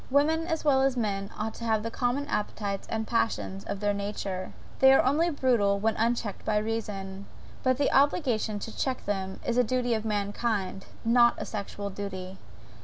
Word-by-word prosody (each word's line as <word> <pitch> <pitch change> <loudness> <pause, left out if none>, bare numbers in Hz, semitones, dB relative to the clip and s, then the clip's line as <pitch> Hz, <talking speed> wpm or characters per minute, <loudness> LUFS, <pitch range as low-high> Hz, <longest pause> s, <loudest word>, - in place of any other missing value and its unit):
Women 315 +4 +2
as 320 -2 -2
well 270 -3 +5
as 265 -1 +2
men 200 -3 -1
ought 215 +1 -2
to - - -9
have 220 -2 +1
the 230 - -3
common 245 +5 0
appetites 205 -4 -2
and 220 0 -1
passions 100 - -1
of 200 - -4
their 205 0 +1
nature, 200 -2 -4 0.3
they 265 0 +8
are - - +5
only 300 +6 +3
brutal 240 -9 +2
when 220 +2 +1
unchecked 230 -3 -1
by 215 -1 +1
reason: 205 -3 -3 0.3
but 255 -1 +2
the 285 - +2
obligation 260 -7 +2
to 225 - -6
check 260 -2 -2
them 190 -2 -2
is 240 - 0
the 250 - +6
duty 245 +1 0
of 220 -1 -1
mankind, 205 -2 -1 0.2
not 235 +1 +5
a - - -4
sexual 200 -1 -5
duty. 190 -1 -6
220 Hz, 180 wpm, -28 LUFS, 200-250 Hz, 0.3 s, they